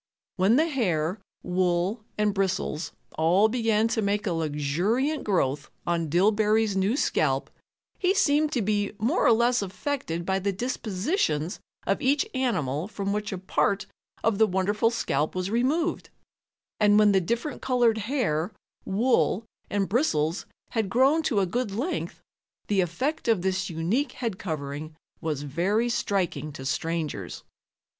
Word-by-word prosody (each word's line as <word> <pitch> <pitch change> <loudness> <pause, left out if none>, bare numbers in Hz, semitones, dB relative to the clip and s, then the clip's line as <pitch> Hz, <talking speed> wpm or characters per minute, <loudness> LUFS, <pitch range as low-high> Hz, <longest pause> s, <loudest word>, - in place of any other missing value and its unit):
When 195 +4 +4
the 310 +4 +4
hair, 185 - 0 0.2
wool 180 +4 0
and 210 -1 +2
bristles 185 -5 -1 0.3
all 180 +7 +5
began 225 -2 +2
to 225 - 0
make 205 0 0
a 195 - 0
luxuriant 165 - 0
growth 145 -8 0 0.2
on 170 -2 0
Dillbery's 210 +4 +3
new 195 +7 +1
scalp, 135 - +1 0.5
he 375 +1 +2
seemed 300 -4 +3
to 240 - +1
be 205 0 0
more 235 - +1
or - - +6
less 235 +1 +3
affected 185 - -3
by 190 +1 +1
the 200 +1 0
dispositions 195 - -1 0.3
of 195 - 0
each 275 +2 +2
animal 170 - -1
from 200 -2 -3
which 210 0 -2
a 190 - -3
part 190 +2 0 0.4
of 220 -2 +1
the 220 - +6
wonderful 205 +4 +1
scalp 155 -10 -1
was 185 +2 -2
removed, 285 +9 0 0.7
and 205 -1 +5
when 210 -1 +6
the 190 -1 +3
different 235 - -2
colored 240 -3 +2
hair, 210 - -1 0.3
wool 225 0 +2 0.2
and 200 -1 0
bristles 175 - 0 0.2
had 220 -4 -1
grown 270 +9 +4
to 230 -10 +1
a - - +2
good 240 +5 -1
length 245 - -3 0.4
the 200 -2 +2
effect 255 - -2
of 220 -6 +2
this 190 0 0
unique 175 - -1
head 225 -7 -4
covering 155 -2 -5 0.3
was 150 -3 -2
very 190 - 0
striking 190 -8 -1
to 135 -2 -9
strangers. 160 +2 -3
200 Hz, 145 wpm, -26 LUFS, 175-235 Hz, 0.7 s, or